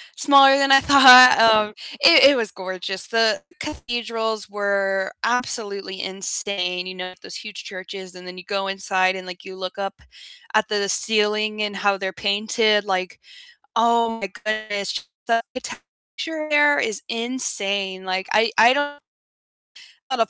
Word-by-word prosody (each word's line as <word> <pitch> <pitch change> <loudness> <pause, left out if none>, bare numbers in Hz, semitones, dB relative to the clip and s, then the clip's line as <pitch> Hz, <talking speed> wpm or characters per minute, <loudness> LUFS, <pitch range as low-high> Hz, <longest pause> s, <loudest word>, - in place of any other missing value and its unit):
smaller 275 -2 +5
than 275 -1 +1
I 270 - +8
thought, 255 -3 +8
um, 215 -2 +3 0.3
i 295 +1 +8
it 275 +1 +7
was 230 -4 -2
gorgeous, 185 0 -6
the 225 -3 0 0.2
cathedrals 230 -7 -5
were 195 -1 -2
absolutely 210 -5 -3
insane, 185 -1 0
you 185 - -8
know, 185 0 -8
those - - -11
huge 210 -3 -9
churches 185 -1 -10
and 180 0 -13
then 180 - -11
you 180 - -12
go 195 -1 -3
inside 190 -1 -1
and, 185 -1 -9
like, 180 -1 -11
you 190 0 -10
look 185 +1 -8
up 195 -1 -6 0.5
at 215 - +2
the 205 -1 -2
ceiling 215 0 0
and 205 -1 -3
how 200 0 0
they're 190 -1 -5
painted, 210 +2 0
like, 185 -2 -4 0.6
oh 230 0 +1
my 195 - -4 0.2
goodness, 215 -2 -4 0.2
the 230 0 +1
architecture 305 +5 -9
there 295 -1 +3
is 215 -3 -2
insane, 200 -6 -1
like, 185 0 -3
I 220 +1 +2
I 230 +2 +6
don't 290 +1 -4 1.1
a 260 - -3
lot 225 -1 0
210 Hz, 150 wpm, -21 LUFS, 190-230 Hz, 1.1 s, I